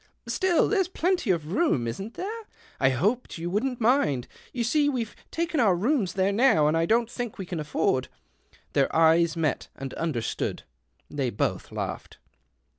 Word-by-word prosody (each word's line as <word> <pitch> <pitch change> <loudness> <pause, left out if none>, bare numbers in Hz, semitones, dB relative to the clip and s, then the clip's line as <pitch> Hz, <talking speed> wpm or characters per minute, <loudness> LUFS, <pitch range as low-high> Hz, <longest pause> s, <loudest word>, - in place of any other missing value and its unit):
" - - -34
Still, 370 -3 +2
there's 385 -4 +2
plenty 360 - 0
of 165 -4 0
room, 280 - +2
isn't 195 - -5
there? 435 +4 -5 0.2
[ - - -22
hoped 180 - +1
you 170 +1 -4
wouldn't 245 +5 -1
mind. 220 - +2 0.2
You 240 - -2
see 290 +5 +2
we've 240 -6 -3 0.2
:aken 335 -1 -1
our 205 -7 +4
rooms 210 - +1
there 190 +1 +1
now, 200 - +4
and 155 +2 +3
I 165 0 +1
don't 230 +3 +3
think 240 -2 -5
we 190 - -5
can 175 -2 -4
afford 145 -3 0 0.3
" - - -32
Their 140 -1 +3
eyes 165 0 +4
met 155 -4 -1
and 135 -1 -6
understood. 145 -9 -2 0.5
They 140 -4 -1
both 105 - -2
laughed. - - -5
195 Hz, 175 wpm, -26 LUFS, 155-265 Hz, 0.5 s, our